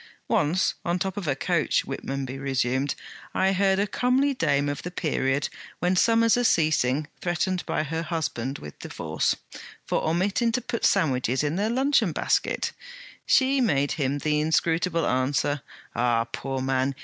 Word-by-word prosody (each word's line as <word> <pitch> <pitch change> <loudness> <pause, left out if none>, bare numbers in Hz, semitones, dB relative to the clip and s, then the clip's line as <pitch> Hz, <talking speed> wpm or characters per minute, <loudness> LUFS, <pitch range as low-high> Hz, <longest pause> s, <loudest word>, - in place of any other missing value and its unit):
'Once, 170 +6 +2
on 170 0 0
the - - -1
top 190 0 -3
of 200 -5 -4
a 140 - +1
coach,' 170 +2 +1
Whitmonby 135 -1 -4
resumed, 135 0 0 0.4
'I 190 +1 +3
heard 195 0 +2
a 200 - +2
comely 255 +6 +1
dame 145 - +1
of 145 0 -3
the 180 - -5
period 145 -5 0 0.3
when 180 +2 +1
summers 230 +3 +4
are 245 - +1
ceasing 155 - +2 0.2
threatened 180 +1 -1
by - - 0
her 160 +2 -3
husband 150 -6 -3
with 75 - -9
a - - -7
divorce, - - -1 0.5
for - - 0
omitting 190 +8 +1
to 250 - 0
put 235 -1 -2
sandwiches 130 -2 +2
in 150 +2 0
their 205 +4 0
luncheon 250 - +2
basket. - - 0 0.6
She 265 0 +4
made 145 - +2
him 140 -2 0
the 150 +1 0
inscrutable 165 +2 +1
answer: 135 +2 0 0.3
"Ah, 120 -1 +2
poor 130 +3 -4
man! 135 +1 0
155 Hz, 160 wpm, -26 LUFS, 135-190 Hz, 0.6 s, summers